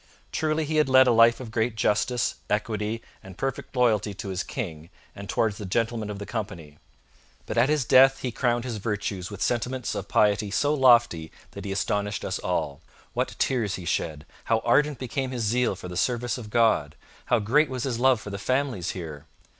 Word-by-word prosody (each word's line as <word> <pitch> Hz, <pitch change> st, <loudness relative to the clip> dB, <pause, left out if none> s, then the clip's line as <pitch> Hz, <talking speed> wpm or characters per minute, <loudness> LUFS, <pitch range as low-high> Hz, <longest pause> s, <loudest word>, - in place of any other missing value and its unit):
Truly 155 Hz, 0 st, 0 dB
he 155 Hz, +1 st, -1 dB
had 150 Hz, -3 st, +3 dB
led 130 Hz, 0 st, +7 dB
a 125 Hz, -, +4 dB
life 115 Hz, 0 st, +5 dB
of 120 Hz, -4 st, -8 dB
great 110 Hz, 0 st, 0 dB
justice, 115 Hz, +3 st, +1 dB, 0.2 s
equity, 105 Hz, +1 st, -2 dB, 0.2 s
and 95 Hz, -1 st, -12 dB
perfect 135 Hz, 0 st, -4 dB
loyalty 110 Hz, -5 st, +2 dB
to 100 Hz, -, -6 dB
his 95 Hz, 0 st, -2 dB
King 85 Hz, -, -6 dB, 0.3 s
and 100 Hz, 0 st, -9 dB
towards 110 Hz, -2 st, 0 dB
the -, -, -5 dB
Gentlemen 115 Hz, +1 st, -1 dB
of 105 Hz, -, -5 dB
the 100 Hz, -, -6 dB
Company. 95 Hz, -11 st, -6 dB, 0.7 s
But -, -, -5 dB
at 135 Hz, -, +3 dB
his 150 Hz, -4 st, +1 dB
death 135 Hz, +2 st, +6 dB
he 125 Hz, -, -2 dB
crowned 120 Hz, 0 st, 0 dB
his 120 Hz, -3 st, -4 dB
virtues 100 Hz, -3 st, -3 dB
with 100 Hz, -2 st, -4 dB
sentiments 125 Hz, +1 st, -1 dB
of 100 Hz, -, -5 dB
piety 105 Hz, 0 st, +2 dB
so 145 Hz, +8 st, +1 dB
lofty 120 Hz, -, +4 dB, 0.2 s
that 100 Hz, -1 st, -9 dB
he 100 Hz, -, -3 dB
astonished 105 Hz, +1 st, -1 dB
us -, -, -2 dB
all. 70 Hz, 0 st, -2 dB, 0.3 s
What -, -, -2 dB
tears 115 Hz, -7 st, 0 dB
he 90 Hz, -, -8 dB
shed! 80 Hz, -2 st, -2 dB, 0.2 s
how 115 Hz, -1 st, +1 dB
ardent 145 Hz, +4 st, +3 dB
became 130 Hz, +1 st, -3 dB
his 125 Hz, -3 st, -3 dB
zeal 120 Hz, 0 st, +1 dB
for 90 Hz, -, -9 dB
the 90 Hz, -, -7 dB
service 120 Hz, +5 st, 0 dB
of 115 Hz, -4 st, -8 dB
God! 110 Hz, -11 st, +2 dB, 0.3 s
how 125 Hz, -, +3 dB
great 135 Hz, +8 st, +2 dB
was 130 Hz, -2 st, -4 dB
his 125 Hz, -4 st, -2 dB
love 130 Hz, -2 st, +4 dB
for 105 Hz, -, -8 dB
the 100 Hz, -, -5 dB
families 130 Hz, -6 st, -1 dB
here! 80 Hz, -5 st, -8 dB
115 Hz, 200 wpm, -26 LUFS, 100-125 Hz, 0.7 s, led